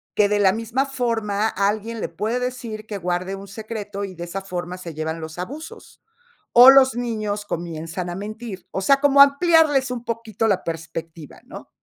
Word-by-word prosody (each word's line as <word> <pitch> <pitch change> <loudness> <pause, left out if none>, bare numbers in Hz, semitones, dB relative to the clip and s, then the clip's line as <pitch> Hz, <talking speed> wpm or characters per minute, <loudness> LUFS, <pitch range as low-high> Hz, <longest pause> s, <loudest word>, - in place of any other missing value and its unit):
que 205 -1 +3
de 205 0 +1
la 190 -2 +4
misma 230 +5 -1
forma 225 -5 -1
alguien 215 +3 -1
le - - -3
puede 215 +8 -2
decir 240 -4 -5
que 210 -2 -5
guarde 180 +2 -2
un 195 +1 -10
secreto, 205 -1 -6
y 195 -2 -5
de 170 0 -6
esa 190 +3 -5
forma 180 -1 -5
se 175 -3 -8
llevan 160 +1 -4
los 160 +1 -8
abusos. 290 - -9 0.5
O 250 +2 +10
los 265 -2 +5
niños 215 -4 -3
comienzan 170 0 -5
a 175 - -4
mentir, 210 0 -7
o - - -3
sea, 275 +8 +4
como 280 -1 +4
ampliarles 285 -2 +5
un 245 -1 -5
poquito 225 -1 -2
la 195 -3 +1
perspectiva, 165 -1 -7
¿no? - - -11
210 Hz, 185 wpm, -22 LUFS, 180-240 Hz, 0.5 s, O